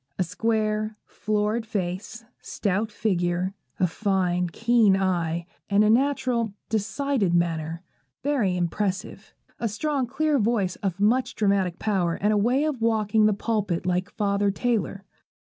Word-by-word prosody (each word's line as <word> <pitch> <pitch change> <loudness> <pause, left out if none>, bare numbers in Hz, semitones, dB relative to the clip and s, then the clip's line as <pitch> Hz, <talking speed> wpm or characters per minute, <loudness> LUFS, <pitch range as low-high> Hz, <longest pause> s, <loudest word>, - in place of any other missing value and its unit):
A 185 - +2
square, 215 +3 -1
florid 215 +2 -1
face, 210 +2 -4 0.2
stout 210 +2 -1
figure, 180 -3 0 0.3
a 185 - +4
fine 180 -1 0
keen 225 +1 +3
eye, 170 -3 0 0.2
and 200 +1 +4
a 215 - +4
natural, 245 -4 +1
decided 220 -2 0
manner, 165 0 -1 0.4
very 245 -11 +1
impressive. 190 +3 -3 0.2
A 230 - 0
strong, 275 +4 -1
clear 295 +3 +1
voice 205 -5 +1
of 195 -2 -3
much 235 +6 +2
dramatic 195 -4 +1
power, 185 -6 0
and 210 +2 +1
a - - +2
way 245 +7 +2
of 300 -6 -2
walking 220 -1 +3
the 215 - +3
pulpit 205 -5 -1
like 180 +2 0
Father 200 -1 0
Taylor. 200 -2 -1
205 Hz, 135 wpm, -25 LUFS, 185-225 Hz, 0.4 s, a